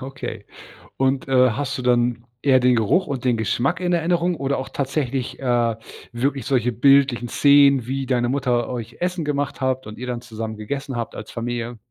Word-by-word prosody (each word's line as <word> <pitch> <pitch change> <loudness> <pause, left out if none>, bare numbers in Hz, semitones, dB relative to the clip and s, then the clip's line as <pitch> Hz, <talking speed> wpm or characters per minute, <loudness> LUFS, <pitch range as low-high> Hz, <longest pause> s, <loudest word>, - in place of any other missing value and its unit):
Okay 130 -5 -7 0.5
und, 135 0 0
äh, 130 -2 +4
hast 140 +5 -3
du - - -4
dann 120 -1 +1 0.2
eher 130 -1 +4
den 125 0 +4
Geruch 140 - +2
und 135 -4 -4
den 120 -3 +2
Geschmack 120 +7 0
in 180 -1 0
Erinnerung 175 +1 +1
oder 140 -1 -1
auch 130 - -4
tatsächlich, 135 -2 -2
äh, 120 -3 +1 0.4
wirklich 135 +1 -1
solche 125 -3 +1
bildlichen 130 -1 +3
Szenen, 140 -2 +5
wie 135 +1 -2
deine 120 -2 +1
Mutter 125 -3 0
euch 120 -2 -6
Essen 180 -1 -1
gemacht 145 -1 -2
habt 130 -2 -1
und 105 - -9
ihr 125 - -6
dann 120 -1 -3
zusammen 110 -2 -6
gegessen 135 +5 -5
habt 115 -2 -4
als 105 - -8
Familie? 120 0 -4
130 Hz, 185 wpm, -22 LUFS, 120-140 Hz, 0.5 s, Szenen